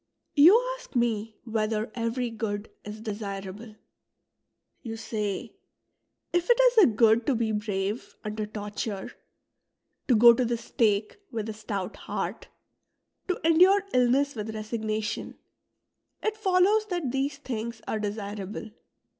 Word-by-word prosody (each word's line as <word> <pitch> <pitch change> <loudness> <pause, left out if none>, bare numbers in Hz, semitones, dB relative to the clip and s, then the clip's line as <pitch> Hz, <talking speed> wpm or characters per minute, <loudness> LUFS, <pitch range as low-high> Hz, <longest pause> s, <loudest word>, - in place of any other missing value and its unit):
'' - - -52
You 405 +7 +9 0.2
ask - - -16
me 225 -2 0
whether 220 -1 -1
every 235 +1 -2
good 215 -2 -4
is 210 +1 -8
desirable. 205 0 -6 1.1
You 225 -2 -6
say: 210 -3 -3 0.4
" - - -52
If 350 +3 +1
it 480 0 +5
is - - +5
a 405 - +8
good 225 0 +3
to 275 - +3
be 225 -1 0
brave 210 0 -3
under 215 0 -3
torture, 205 -1 -5 1.0
to 250 - +5
go 235 +2 +9
to 250 - +1
the 235 0 0
stake 210 -2 0
with 220 -2 -4
a - - -3
stout 210 -3 -5
heart, - - -4 0.8
to 365 - -1
endure 365 +5 +6
illness 255 +3 +3
with 220 -1 -5
resignation, 215 0 -3 0.9
it 435 0 0
follows 410 +1 +3
that 350 - -2
these 270 +2 -1
things 235 -4 -5
are 220 - -1
desirable. 205 0 -5
225 Hz, 135 wpm, -27 LUFS, 210-260 Hz, 1.1 s, You